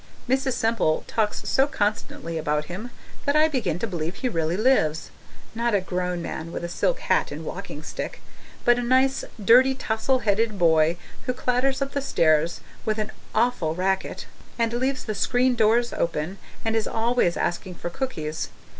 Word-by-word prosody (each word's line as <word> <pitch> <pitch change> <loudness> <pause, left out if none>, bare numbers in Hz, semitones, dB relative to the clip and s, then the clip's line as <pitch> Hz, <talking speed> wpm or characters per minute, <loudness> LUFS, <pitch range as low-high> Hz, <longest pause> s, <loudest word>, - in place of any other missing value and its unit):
Mrs. 265 +1 +1
Semple 225 -9 +1
talks 215 -2 -1
so 270 +1 +3
constantly 205 - -2
about 150 -1 0
him 195 +9 -6 0.4
that 285 0 +2
I 310 +1 +6
begin 225 - -1
to 195 - -2
believe 175 -4 -3
he 255 +4 -1
really 165 -3 0
lives 205 - +2 0.4
not 235 -1 +1
a - - +4
grown 180 -1 -2
man 165 0 -5
with - - -5
a 170 - -3
silk - - 0
hat - - +1
and - - -6
walking - - -6
stick, - - -5 0.5
but 240 0 +5
a - - 0
nice, 260 +2 +3 0.2
dirty, 250 +6 +6
tousle 255 +2 0
headed 215 0 +1
boy 165 -1 +4 0.3
who 250 - +1
clatters 255 +2 +1
up 275 - -5
the 280 - -1
stairs 165 - +2 0.2
with 215 0 0
an 215 0 -2 0.2
awful 215 -9 +1
racket, 190 +2 -1 0.3
and 230 -1 +1
leaves 260 +2 -1
the 215 - -2
screen 250 +4 +2
doors 235 +1 +3
open, 170 +3 -2 0.3
and 225 0 +1
is 225 - +1
always 225 -6 +1
asking 180 +1 -2
for 175 - -5
cookies. 160 - -3
220 Hz, 170 wpm, -25 LUFS, 170-250 Hz, 0.5 s, I